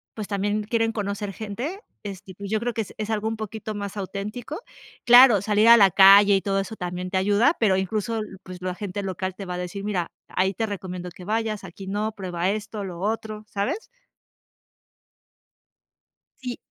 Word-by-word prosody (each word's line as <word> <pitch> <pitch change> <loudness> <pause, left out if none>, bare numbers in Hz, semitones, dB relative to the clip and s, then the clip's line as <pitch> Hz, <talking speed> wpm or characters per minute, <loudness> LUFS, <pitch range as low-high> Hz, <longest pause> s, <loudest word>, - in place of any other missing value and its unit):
pues 215 -3 -5
también 205 +1 -1
quieren 225 +1 0
conocer 205 -1 -3
gente, 235 - -5 0.2
este, 195 -2 -8
y - - -11
pues 200 +1 -7
yo 220 - +1
creo 240 +2 -2
que 225 - -1
es 210 - -8
es 215 0 -4
algo 220 0 -1
un 225 - -1
poquito 215 0 -5
más 200 0 -5
auténtico. 210 - -5 0.4
Claro, 245 -4 +8
salir 210 +2 +3
a 235 - +10
la 195 -3 +6
calle 200 +2 +8
y 195 - +1
todo 195 0 0
eso 195 +3 -4
también 180 -1 -4
te 190 - 0
ayuda, 205 - +3
pero 210 -5 +4
incluso, 215 +4 -1 0.2
pues 185 -1 -10
la 180 0 -3
gente 200 0 -4
local 190 -1 -3
te 195 - -7
va 180 -1 -4
a - - -4
decir: 180 +2 -5
"Mira, 190 -5 -1 0.2
ahí 190 +1 0
te 225 - -1
recomiendo 185 -3 -5
que 180 +1 -12
vayas, 215 0 -1
aquí 190 +1 -10
no, 210 +2 -2
prueba 185 -3 -2
esto, 210 0 -3
lo 175 -2 -7
otro", 215 +1 -3
¿sabes? 235 - -2 2.6
Sí. 250 -1 -4
205 Hz, 190 wpm, -24 LUFS, 190-220 Hz, 2.6 s, a